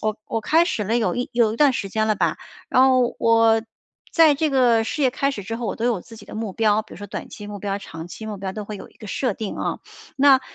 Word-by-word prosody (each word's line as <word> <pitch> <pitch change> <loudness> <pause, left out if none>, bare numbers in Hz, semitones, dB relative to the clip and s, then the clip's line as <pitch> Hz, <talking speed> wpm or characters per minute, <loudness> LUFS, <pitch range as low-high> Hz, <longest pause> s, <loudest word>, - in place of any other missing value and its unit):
我 215 -1 0
我 225 - -2
开 330 +7 +4
始 210 - -1
了 225 +4 +1
有 225 - 0
一 245 - -2
有 230 -2 +3
一 - - -7
段 290 -3 +5
时 200 -4 -3
间 215 +2 0
了 215 - +2
吧。 - - 0 0.3
然 255 - +4
后 255 -2 +4
我 225 -1 +4 0.5
在 320 -3 +6
这 310 +2 +1
个 240 -4 +4
事 300 - -4
业 260 - +4
开 275 +2 0
始 205 -7 -6
之 225 +4 -4
后， 240 - -5
我 - - -3
都 230 - -3
有 235 -6 +1
自 225 - -13
己 - - -13
的 - - -10
目 215 -3 -4
标， 215 0 +2
比 - - -17
如 - - -10
说 205 - -7
短 - - -6
期 205 - -9
目 205 -1 -7
标、 200 0 -3
长 165 -4 -9
期 220 +5 -9
目 210 - -5
标， 190 -1 -5
都 210 0 -6
会 210 - -6
有 - - -10
一 - - -27
个 215 - -11
设 250 +4 -1
定 210 +1 -5
啊。 - - -2 0.4
那 270 -1 +6
225 Hz, 305 characters per minute, -22 LUFS, 210-255 Hz, 0.5 s, 在